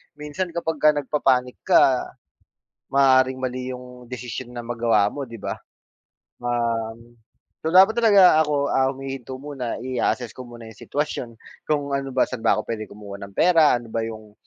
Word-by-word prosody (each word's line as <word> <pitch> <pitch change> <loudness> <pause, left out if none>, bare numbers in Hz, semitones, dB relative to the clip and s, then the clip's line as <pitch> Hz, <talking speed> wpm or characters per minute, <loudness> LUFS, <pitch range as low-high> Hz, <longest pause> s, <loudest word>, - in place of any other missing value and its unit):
minsan 150 +5 -4
kapagka 155 -3 +2
nagpa-panic 130 -3 0
ka, 130 -2 +4 0.8
maaaring 130 -1 +3
mali 130 0 -3
'yung 125 -1 -12
desisyon 125 0 -7
na 120 - -5
magawa 115 -3 +1
mo 140 -3 -6
'di 115 - -9
ba. - - -5 0.9
Um, 115 -1 -2 0.5
so 160 - -1
dapat 195 +5 +6
talaga 200 -8 +6
ako, 145 -1 0
ah, 130 - +2
humihinto 135 -1 -7
muna, 135 -5 -4
i-a-assess 125 -2 -1
ko 130 - -8
muna 120 -1 -11
'yung 110 - -15
sitwasyon, 145 -4 -2 0.4
kung 145 -2 0
ano 135 0 -4
ba, 130 - +3
saan 130 - -5
ba - - +5
ako 110 - -1
puwede 110 -2 -4
kumuha 100 -1 -10
ng 100 0 -9
pera, 165 -4 +5
ano 120 - -12
ba 115 - -1
'yung 110 -2 -10
130 Hz, 160 wpm, -23 LUFS, 115-145 Hz, 0.9 s, dapat